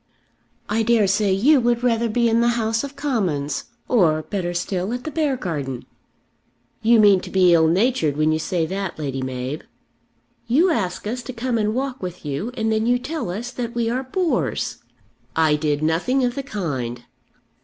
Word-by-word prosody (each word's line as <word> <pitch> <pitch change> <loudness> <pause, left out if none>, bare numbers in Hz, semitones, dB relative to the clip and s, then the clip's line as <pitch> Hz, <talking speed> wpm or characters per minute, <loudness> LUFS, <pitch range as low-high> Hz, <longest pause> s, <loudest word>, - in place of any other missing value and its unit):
"I 215 +2 0
dare 225 -1 +3
say 200 +1 +2
you 260 +9 +4
would 240 0 +1
rather 235 -1 +2
be 235 +2 +2
in 230 0 +3
the 240 0 +2
House 225 +1 0
of 280 0 -7
Commons; 185 - -1 0.2
or, 160 -10 +3
better 180 -2 -3
still, 180 +4 -2
at 250 0 -4
the 310 - -5
Beargarden." 175 - -2 1.0
"You 230 +1 +5
mean 205 -3 +6
to - - -9
be 185 -2 +4
ill 160 -1 +5
natured 175 - +1
when 155 +1 +3
you 155 - +1
say 165 +1 -1
that, 190 +1 -4
Lady 135 -3 -3
Mab." 130 +3 -4 0.8
"You 320 +10 +4
ask 185 - -2
us 240 +4 -3
to 255 - -7
come 240 0 -1
and 215 +1 0
walk 265 0 -3
with 180 -3 -6
you, 145 - -3
and 220 0 0
then 220 +1 +1
you 245 +1 +4
tell 280 - -4
us 225 +7 -4
that 240 -1 -5
we 230 -1 0
are 255 +2 -1
bores!" 330 +7 -1 0.6
"I 160 -2 +4
did 150 0 -1
nothing 185 +12 +1
of 245 -1 +1
the 275 - -3
kind." 135 - -4
215 Hz, 185 wpm, -22 LUFS, 160-245 Hz, 1.0 s, mean